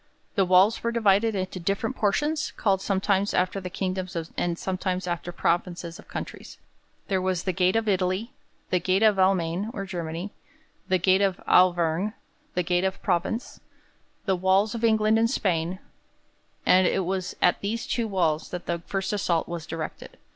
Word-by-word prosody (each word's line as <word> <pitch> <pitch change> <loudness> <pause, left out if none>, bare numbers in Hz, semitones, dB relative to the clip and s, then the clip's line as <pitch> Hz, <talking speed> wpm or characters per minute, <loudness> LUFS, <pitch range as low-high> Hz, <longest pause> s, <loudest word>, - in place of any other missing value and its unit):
The 195 -4 +2
walls 185 +4 +4
were 235 - 0
divided 220 -1 +3
into 185 0 -3
different 200 +8 -1
portions, 295 +9 0
called 195 -3 +1
sometimes 195 0 +1
after 185 +2 0
the 180 - -5
kingdoms 185 0 -3 0.2
and 175 -1 -1
sometimes 185 0 -2
after 175 0 -3
provinces 170 0 -1
of - - -14
countries. - - -7 0.5
There 190 -2 0
was 185 -1 -1
the 185 - -1
'gate 185 +2 +2
of 225 -1 +1
Italy,' 190 +4 0 0.4
the 180 - +3
'gate 185 +4 +1
of 210 -3 +4
Almaine' 185 +1 +2
or 195 -1 -3
Germany, 175 +1 -5 0.6
the 185 -1 +3
'gate 185 +2 +3
of 195 -2 +1
Auvergne,' 180 +2 +3 0.4
the 180 - +1
'gate 175 +1 +1
of 190 0 -1
Provence,' 225 +7 -1 0.7
the 190 -3 +2
'Walls 190 +3 +2
of 230 -1 -5
England 220 -1 +4
and 230 0 +3
Spain'; 180 -7 0 0.9
and 185 0 +5
it 190 - 0
was 185 0 -2
at 180 - +3
these 225 +3 -2
two 235 -2 -1
walls 170 -6 0
that 180 -1 -6
the 170 0 -2
first 195 +1 -2
assault 175 -5 0
was 170 -2 -6
directed. 160 -1 -6
190 Hz, 170 wpm, -26 LUFS, 180-200 Hz, 0.9 s, and